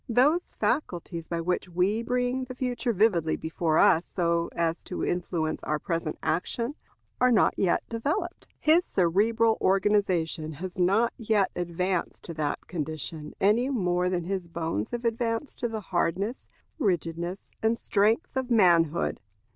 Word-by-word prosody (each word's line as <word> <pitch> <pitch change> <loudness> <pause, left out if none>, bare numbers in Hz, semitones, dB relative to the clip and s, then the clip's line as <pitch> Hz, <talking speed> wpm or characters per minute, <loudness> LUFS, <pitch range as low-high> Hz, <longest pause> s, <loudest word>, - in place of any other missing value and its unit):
Those 280 +9 +4 0.2
faculties 170 - -1
by 170 -1 -2
which 180 +2 -1
we 185 +6 +1
bring 250 +2 -1
the 255 0 -8
future 250 -1 -1
vividly 180 -7 +2
before 160 0 -1
us 165 +2 +5
so 170 -2 0
as 165 0 0
to 180 - -3
influence 170 -3 -1
our 150 - -1
present 165 0 -3
action, 230 - -1 0.5
are 250 0 +4
not 215 -5 +4
yet 185 - +1
developed. 340 - -3
His 325 +3 +4
cerebral 220 - +2
organization 185 -5 +1
has 180 +5 -7
not 200 +6 +3
yet 215 -4 +1
advanced 180 +1 -2
to 170 - -6
that 150 -2 -2
condition, 155 -2 -4
any 225 +6 +3
more 180 -7 +1
than 180 -2 -1
his 185 0 -3
bones 165 -10 -3
have 240 0 -4
advanced 230 +3 -1
to 240 - 0
the 220 -2 -4
hardness, 190 +5 -1 0.3
rigidness, 175 - -2
and 225 +1 +2
strength 220 +8 +1
of 260 -1 -1
manhood. 170 -7 +3
185 Hz, 145 wpm, -27 LUFS, 170-230 Hz, 0.5 s, us